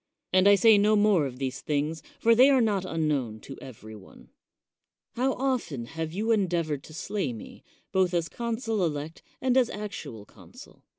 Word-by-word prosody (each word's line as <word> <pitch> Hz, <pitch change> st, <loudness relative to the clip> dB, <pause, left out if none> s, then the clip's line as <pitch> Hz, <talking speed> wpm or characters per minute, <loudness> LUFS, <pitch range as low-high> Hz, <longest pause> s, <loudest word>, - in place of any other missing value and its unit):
And 185 Hz, +1 st, +5 dB
I 205 Hz, -, +8 dB
say 210 Hz, +1 st, +6 dB
no 210 Hz, +1 st, +4 dB
more 205 Hz, -8 st, +3 dB
of 125 Hz, -1 st, -9 dB
these 135 Hz, 0 st, -4 dB
things, 150 Hz, +1 st, -2 dB, 0.2 s
for 230 Hz, -, +4 dB
the 255 Hz, +4 st, +6 dB
are 270 Hz, -2 st, +4 dB
not 205 Hz, -5 st, +1 dB
unknown 150 Hz, -10 st, -1 dB
to 135 Hz, -, -9 dB
every 110 Hz, -4 st, -11 dB
one. 95 Hz, -3 st, -16 dB, 0.8 s
How 260 Hz, +2 st, 0 dB
often 245 Hz, -, -2 dB
have 160 Hz, +5 st, -5 dB
you 215 Hz, +6 st, -1 dB
endeavored 170 Hz, -8 st, 0 dB
to 155 Hz, -, -13 dB
slay 170 Hz, -6 st, -3 dB
me, 110 Hz, -, -11 dB, 0.3 s
both 190 Hz, -2 st, +2 dB
as 170 Hz, -1 st, 0 dB
consul 225 Hz, -2 st, -2 dB
elect 155 Hz, 0 st, -3 dB, 0.2 s
and 255 Hz, -1 st, +2 dB
as 255 Hz, -3 st, +4 dB
actual 200 Hz, -, -7 dB
consul? -, -, -16 dB
180 Hz, 175 wpm, -27 LUFS, 145-220 Hz, 0.8 s, I